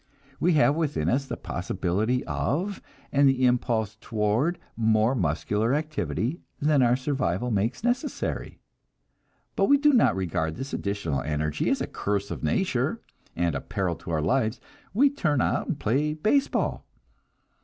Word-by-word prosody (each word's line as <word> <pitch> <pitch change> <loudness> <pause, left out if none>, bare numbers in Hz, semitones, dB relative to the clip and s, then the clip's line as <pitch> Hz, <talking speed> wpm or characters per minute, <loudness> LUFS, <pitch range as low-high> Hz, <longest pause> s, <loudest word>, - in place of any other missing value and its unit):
We 175 +1 +3
have 145 -2 +4
within 155 -3 0
us 135 +2 0
the - - -4
possibility 95 +7 -1
of 185 +8 -2 0.3
and 140 0 +5
the 130 -1 +2
impulse 115 -3 +1
toward 115 +11 0 0.2
more 110 +1 +3
muscular 105 - 0
activity 145 - -2 0.2
than 145 -1 +3
our 120 -1 +4
survival 125 - -1
makes 110 - -1
necessary; 245 +4 -2 1.0
but - - +3
we 285 - +5
do 295 +1 +4
not 240 - +4
regard 80 -4 -1
this 135 +2 -6
additional 100 -9 -2
energy 75 0 -1
as - - +1
a - - 0
curse 100 0 -2
of - - -5
nature, 75 - 0 0.4
and 85 -1 0
a 70 - -3
peril 95 -3 -2
to - - -10
our 80 -2 0
lives 120 - +1 0.3
we 265 +8 +4
turn 175 - 0
out - - 0
and 150 - -2
play 145 +7 +1
baseball. 220 - 0
120 Hz, 150 wpm, -26 LUFS, 100-150 Hz, 1.0 s, and